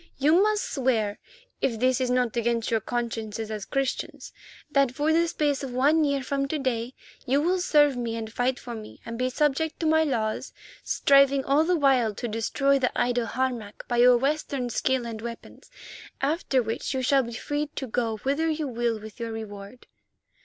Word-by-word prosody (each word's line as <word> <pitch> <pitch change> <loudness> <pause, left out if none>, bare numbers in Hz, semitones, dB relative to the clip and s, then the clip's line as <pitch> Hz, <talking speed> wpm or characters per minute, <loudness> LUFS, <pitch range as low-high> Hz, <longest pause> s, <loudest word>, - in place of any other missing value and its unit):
You 310 +6 +4
must 425 -1 +2
swear—if 260 - -2
this 255 +1 +2
is 255 - 0
not 250 -2 +1
against 235 -1 0
your 225 - +3
consciences 225 -1 -4
as 210 -2 -4
Christians—that 275 0 -2
for 295 +4 +1
the 335 +1 +3
space 295 -4 0
of 260 -2 -5
one 295 +5 +4
year 280 -2 0
from 275 +1 -1
to 310 - -2
day 255 -3 -2 0.3
you 270 +3 +3
will 360 +5 +1
serve 295 -5 +4
me 235 -2 -3
and 220 -1 -6
fight 250 +2 0
for 240 - -8
me 215 -2 -9
and 230 - -5
be 255 +2 0
subject 300 +3 0
to 330 - -2
my 315 0 +4
laws, 220 -7 -2 0.3
striving 275 -1 +4
all 285 +3 +3
the 355 +2 +2
while 255 -7 +3
to 240 - -4
destroy 275 +5 +1
the 250 - +1
idol 245 -1 +1
Harmac 240 -5 -3
by 240 - -1
your 245 0 +7
Western 275 -2 -1
skill 260 0 0
and 225 -2 -6
weapons, 235 0 -9 0.5
after 275 -3 +1
which 225 +4 -3
you 260 - -1
shall 275 +2 +4
be 235 -2 -6
free 290 +6 -2
to 270 - -3
go 230 -2 -1
whither 285 +4 +1
you 310 -1 -1
will 235 -2 -1
with 215 +2 -11
your 230 -1 -4
reward." 210 +1 -8
255 Hz, 185 wpm, -26 LUFS, 230-285 Hz, 0.5 s, your